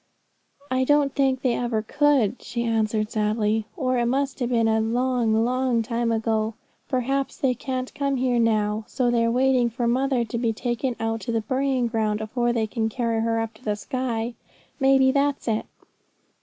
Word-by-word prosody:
'I 260 0 +2
don't 290 -1 +3
think 265 -2 +1
they 250 -3 +2
ever 235 -3 -1
could,' 270 -4 +2
she 235 0 -3
answered 220 -2 0
sadly, 215 0 0
'or 255 -5 0
it 235 - +1
must 270 +2 -1
have 245 -2 -1
been 230 -2 +2
a 220 0 +2
long, 230 -1 +1
long 250 -1 +1
time 235 0 -1
ago. 220 -1 0 0.3
Perhaps 270 +1 -1
they 265 -2 +1
can't 255 +1 -4
come 280 -1 -1
here 250 -2 +1
now, 215 -1 +1
so 245 -2 0
they're 230 -1 +2
waiting 250 0 +3
for 235 +1 -2
mother 255 0 +1
to 235 +1 -4
be 230 -2 0
taken 240 +2 -2
out 225 0 -1
to 235 - -3
the 225 -1 0
burying 260 +2 0
ground 220 -2 0
afore 240 +2 -1
they 230 -2 0
can 220 0 -2
carry 230 -1 -1
her 225 0 0
up 225 0 -3
to 220 - -21
the 210 -3 -1
sky. 235 +1 -3 0.5
May 270 0 +5
be 265 0 +4
that's 280 0 0
it.' 220 -1 -1
240 Hz, 185 wpm, -24 LUFS, 225-260 Hz, 0.5 s, May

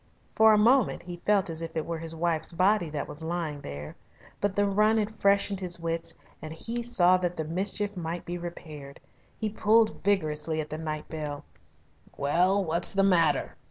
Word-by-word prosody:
For 220 0 +6
a 215 - +5
moment 240 +3 +3
he 175 -1 -8
felt 200 -2 +3
as 160 0 -3
if 165 0 -5
it 160 - -1
were 165 -1 -4
his 165 0 -1
wife's 165 -1 0
body 185 0 +2
that 150 -2 -4
was 145 - -6
lying 160 -3 -3
there. 70 - -8 0.4
But 205 -1 -1
the 205 - +3
run 210 +2 +3
had 215 0 -3
freshened 200 0 +3
his 180 -2 -4
wits 165 0 -2 0.3
and 155 - -7
he 230 +9 -4
saw 185 -7 +4
that 180 -1 -3
the 160 - -1
mischief 200 +5 -1
might 170 0 -4
be 175 0 -4
repaired. 155 -5 -9 0.4
He 220 - -1
pulled 215 +1 +2
vigorously 155 -5 +1
at 150 -1 -4
the 155 - -4
night 155 -1 -4
bell. 150 -2 -6 0.7
"Well, 180 +7 +2
what's 170 +1 0
the 195 - +4
matter?" 175 -5 +2
175 Hz, 190 wpm, -28 LUFS, 160-200 Hz, 0.7 s, For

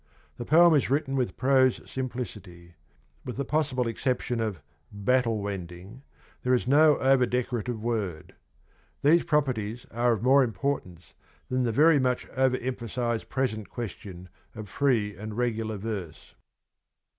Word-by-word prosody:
The 120 - -6
poem 170 +4 +6
is 145 -5 +2
written 140 0 0
with 125 -8 -1
prose 130 -1 +3
simplicity; 105 -9 -7 0.5
with 125 - -6
the 140 - -2
possible 135 -5 0
exception 125 0 -2
of 110 -6 -2 0.2
' - - -39 0.2
battle 120 -4 +2
wending 95 +3 -7 0.2
' - - -31
there 125 0 +2
is 125 - -1
no 150 +2 +5
over 130 -1 +3
decorative 120 -2 -2
word. 105 -9 -3 0.7
These 165 +4 +4
properties 125 -8 -1
are 120 +2 +2
of 110 -1 -4
more 135 +2 +5
importance 115 -8 -4 0.4
than 130 0 0
the 115 - 0
very 150 +5 +5
much 125 -1 0
over 130 -1 +1
emphasised 120 -2 -3
present 110 -6 -2
question 95 -5 -7 0.3
of 110 -2 -8
free 115 -8 +1
and 105 +1 -7
regular 115 -3 -1
verse. 100 -6 -6
120 Hz, 145 wpm, -27 LUFS, 110-130 Hz, 0.7 s, poem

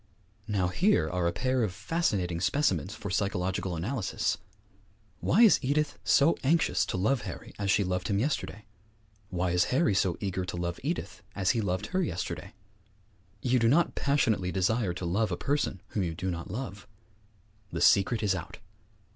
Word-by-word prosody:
Now 95 -4 0
here 150 - +2
are 90 -1 0
a - - +1
pair 130 +6 0
of 105 -5 0
fascinating 90 - -1
specimens 110 -2 +1
for 100 -3 -6
psychological 95 -2 -1
analysis! 105 +5 -1 0.8
Why 210 - +4
is 220 - +7
Edith 145 +2 0
so 150 +4 +4
anxious 160 +5 +2
to - - -2
love 110 +7 +1
Harry 95 -5 -8
as 100 -1 -1
she 100 0 +3
loved 90 -1 -2
him 100 - 0
yesterday? 110 -3 -2 0.6
Why 90 -1 -1
is 90 0 +3
Harry 140 -2 +2
so 95 -2 +1
eager 95 -2 -2
to 90 -1 -5
love 85 0 -3
Edith 165 +6 -4
as 95 -2 +2
he 115 - 0
loved 95 -3 -1
her 190 - +2
yesterday? 90 - -4 0.9
You 125 0 +3
do 115 - +3
not 155 +8 +3
passionately 115 -10 +1
desire 95 +1 0
to 90 - -5
love 105 +6 0
a - - -1
person 140 -10 -1
whom 105 - -2
you 85 -3 -2
do 95 +2 -2
not 80 -1 -6
love. 105 -5 -6 0.8
The - - -3
secret 105 +3 +4
is 100 -2 +2
out! 90 - -6
100 Hz, 170 wpm, -29 LUFS, 90-130 Hz, 0.9 s, is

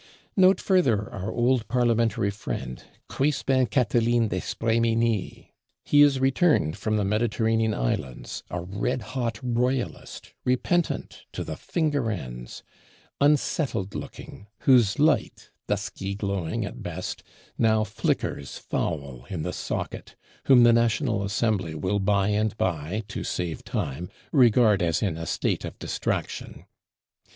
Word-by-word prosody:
Note 190 0 +5
further 125 - +2
our 100 +3 -4
old 120 -2 +1
parlementary 115 -4 +1
friend, 65 -10 -6 0.2
Crispin 135 -2 +1
Catiline 120 -2 +2
d'Espréménil. 115 -2 0 0.4
He 145 - +5
is 145 -2 +5
returned 135 - +2
from 110 -1 -1
the 105 - +1
Mediterranean 110 +1 +1
islands, - - -3
a 90 - -3
red 100 +7 -2
hot 115 -4 -2
royalist, 125 +1 -2
repentant 160 +7 0
to - - -3
the - - -5
finger 145 -7 -1
ends; 60 - -6 0.6
unsettled 140 - +1
looking; 105 - -8
whose 120 -7 +4
light, 155 +2 +1 0.2
dusky 95 +1 -3
glowing 100 -5 -2
at - - -8
best, - - -5 0.4
now 110 -1 +3
flickers 100 -8 -2
foul 70 -5 -3
in 85 -5 -3
the 90 - -3
socket; - - -5 0.3
whom 130 -3 +7
the 120 0 +7
National 115 -1 +1
Assembly 100 -4 0
will 95 +5 0
by 100 0 +2
and 105 0 0
by, 90 +4 -1
to - - -5
save 85 -3 -3
time, 75 +5 -3 0.2
"regard 120 - +5
as 85 +2 +1
in 95 -6 0
a 80 0 -6
state - - -1
of - - -7
distraction." - - -3
110 Hz, 125 wpm, -26 LUFS, 95-125 Hz, 0.6 s, whom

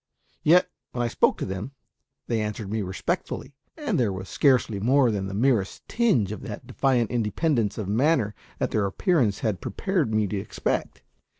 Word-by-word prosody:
Yet, 175 +4 +5 0.3
when 120 - -1
I - - +1
spoke - - +2
to - - -3
them, 95 +8 -5 0.5
they 115 -2 0
answered 105 -1 -4
me 110 0 0
respectfully, 95 +8 -3 0.2
and 300 - -1
there 115 -5 +2
was 95 0 -6
scarcely 125 -7 +3
more 125 +3 +4
than 100 -2 -2
the 95 - -5
merest 115 -4 +1
tinge 200 - +2
of 105 - -6
that - - -7
defiant 125 -4 +1
independence 115 - 0
of 105 -4 -3
manner 115 0 +2 0.2
that - - -1
their 105 -2 +1
appearance 120 - +1
had 105 -4 -1
prepared 185 - -1
me 110 -1 +2
to 100 +1 -2
expect. 95 - -3
110 Hz, 175 wpm, -25 LUFS, 100-135 Hz, 0.5 s, Yet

